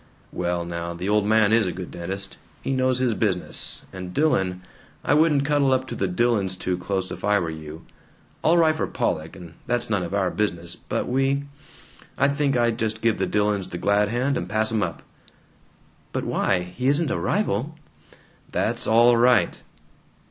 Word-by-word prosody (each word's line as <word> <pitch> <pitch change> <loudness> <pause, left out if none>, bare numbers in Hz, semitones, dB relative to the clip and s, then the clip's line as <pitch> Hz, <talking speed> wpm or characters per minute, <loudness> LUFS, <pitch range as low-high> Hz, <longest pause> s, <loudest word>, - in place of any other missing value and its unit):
"Well 85 -1 -2
now, 85 0 -4
the 90 +3 -4
old 105 0 +2
man 110 0 +4
is 110 -4 +4
a - - -1
good 90 -1 -7
dentist. 95 +3 -5 0.3
He - - -2
knows 130 -1 +2
his 125 -2 +1
business. 100 -4 -1
And 90 -1 -7
Dillon 95 -12 +1 0.4
I - - +3
wouldn't 150 -2 +3
cuddle 145 -2 +2
up 130 0 +1
to 120 - -4
the 95 - -1
Dillons 100 -1 +1
too 90 0 -2
close, 95 +1 -3
if - - -7
I 105 0 +3
were 85 -4 -1
you. 80 0 -9 0.6
All 165 +2 +4
right 160 -2 +5
for - - -1
Pollock, 80 +1 -2
and 85 -3 -11
that's 120 -1 -1
none 100 -3 +1
of 90 +2 -3
our 95 -3 +1
business, 85 -5 -2
but - - -3
we 135 +2 +1 0.7
I 140 - +3
think 140 -2 +1
I'd 120 -1 +1
just 110 -1 -2
give 115 -2 +2
the - - 0
Dillons 105 -2 0
the 90 - -5
glad 100 +3 +2
hand 125 +4 0
and 85 - -4
pass 110 +2 +2
'em 110 -1 +1
up." 85 -5 -3 1.1
"But - - -1
why? 90 -2 +1
He 125 +1 -1
isn't 145 +1 +2
a - - -1
rival." 155 - -1 0.8
"That's - - -1
all 120 +2 +5
right!" 120 -6 +3
105 Hz, 185 wpm, -24 LUFS, 90-125 Hz, 1.1 s, right